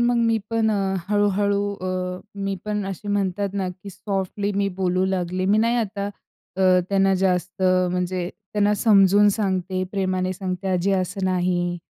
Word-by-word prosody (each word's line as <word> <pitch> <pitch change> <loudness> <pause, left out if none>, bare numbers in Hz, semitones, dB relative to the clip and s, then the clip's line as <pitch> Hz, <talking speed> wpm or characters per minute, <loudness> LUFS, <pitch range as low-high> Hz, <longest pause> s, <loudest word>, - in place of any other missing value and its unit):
मग 240 0 +3
मी 230 -1 +2
पण 225 -1 +2
अ, 195 -2 0
हळूहळू 205 0 +1
अ, 185 0 -3
मी 195 -1 -2
पण 210 -1 -2
असे 195 +1 -6
म्हणतात 200 0 0
ना, 195 -2 -1
की 185 +2 -9
सॉफ्टली 195 +1 -3
मी 200 0 0
बोलू 185 -1 +1
लागले. 185 -1 -1
मी 200 +3 +3
नाही 230 +2 +2
आता 205 -3 -2 0.5
अ, 185 -1 +4
त्यांना 195 -1 +3
जास्त 185 -1 0
म्हणजे, 180 -1 +1 0.2
त्यांना 210 0 +2
समजवून 205 -1 +5
सांगते, 190 -3 -1
प्रेमाने 185 -2 0
सांगते. 185 0 -4
आजी 185 +1 +1
असं 190 +1 -1
नाही. 175 -1 0
195 Hz, 155 wpm, -23 LUFS, 185-205 Hz, 0.5 s, समजवून